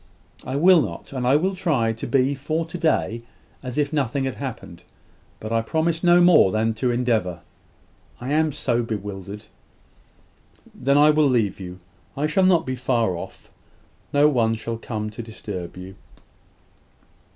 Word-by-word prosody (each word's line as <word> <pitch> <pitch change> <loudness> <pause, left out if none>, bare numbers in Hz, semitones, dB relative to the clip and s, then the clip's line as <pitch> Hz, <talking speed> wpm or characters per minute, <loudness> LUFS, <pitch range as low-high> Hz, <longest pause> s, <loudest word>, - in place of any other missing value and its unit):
"I 130 - -4
will 175 +3 +6
not. - - -6
And 125 -2 -2
I 130 - +5
will 185 +6 +1
try 150 -12 0
to 115 - -6
be 135 0 +2
for 155 +4 -2
to 165 - -10
day 120 -8 0 0.4
as 125 -1 -6
if 145 0 0
nothing 140 -2 0
had 130 -1 -2
happened: 115 -10 -8 0.6
but 110 - -7
I 115 0 +2
promise 160 +7 -1
no 175 0 +6
more 175 - +6
than 110 +2 0
to 115 +3 -1
endeavour 115 -8 0 0.8
I 125 +3 -5
am 155 +1 +2
so 120 -3 -1
bewildered!" 105 -2 -6 1.3
"Then 140 +3 +1
I 150 +1 +6
will 150 -1 +3
leave 110 -7 +1
you. 90 -1 -8 0.4
I 145 - 0
shall 170 +5 +2
not 175 -3 +3
be 130 - -3
far 120 -6 0
off. 85 - -10 0.6
No 145 +1 +5
one 115 -6 +2
shall 115 +1 -5
come 105 -2 -4
to 115 - -7
disturb 100 -6 -7
you." 95 +1 -9
125 Hz, 165 wpm, -23 LUFS, 110-150 Hz, 1.3 s, will